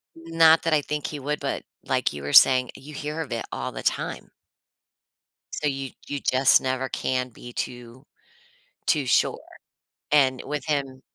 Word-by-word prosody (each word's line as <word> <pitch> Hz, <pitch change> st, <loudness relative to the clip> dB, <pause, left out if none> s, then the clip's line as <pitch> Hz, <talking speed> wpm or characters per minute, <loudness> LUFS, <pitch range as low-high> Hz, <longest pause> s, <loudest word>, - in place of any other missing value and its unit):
Not 165 Hz, 0 st, +4 dB
that 165 Hz, -, +1 dB
I 150 Hz, -, +4 dB
think 150 Hz, +1 st, -3 dB
he 150 Hz, -, -6 dB
would, 150 Hz, +2 st, -3 dB
but 140 Hz, -, -3 dB, 0.2 s
like 130 Hz, -, 0 dB
you 70 Hz, -1 st, -8 dB
were 70 Hz, -, -4 dB
saying, 130 Hz, -2 st, +7 dB
you 150 Hz, +3 st, -11 dB
hear 150 Hz, +2 st, -5 dB
of 155 Hz, -, -7 dB
it 115 Hz, -, -3 dB
all -, -, -4 dB
the -, -, -7 dB
time. -, -, -2 dB, 1.2 s
So, 150 Hz, -, -1 dB
you 135 Hz, -2 st, -3 dB, 0.2 s
you 145 Hz, -, -3 dB
just 130 Hz, 0 st, +4 dB
never 130 Hz, 0 st, -2 dB
can 130 Hz, -1 st, -2 dB
be 120 Hz, +1 st, -12 dB
too 120 Hz, +3 st, -6 dB, 0.8 s
too 145 Hz, -4 st, +2 dB
sure, -, -, +2 dB, 0.7 s
and 135 Hz, -3 st, +3 dB
with 150 Hz, +1 st, -4 dB
him 135 Hz, -3 st, -2 dB
135 Hz, 165 wpm, -25 LUFS, 130-150 Hz, 1.2 s, saying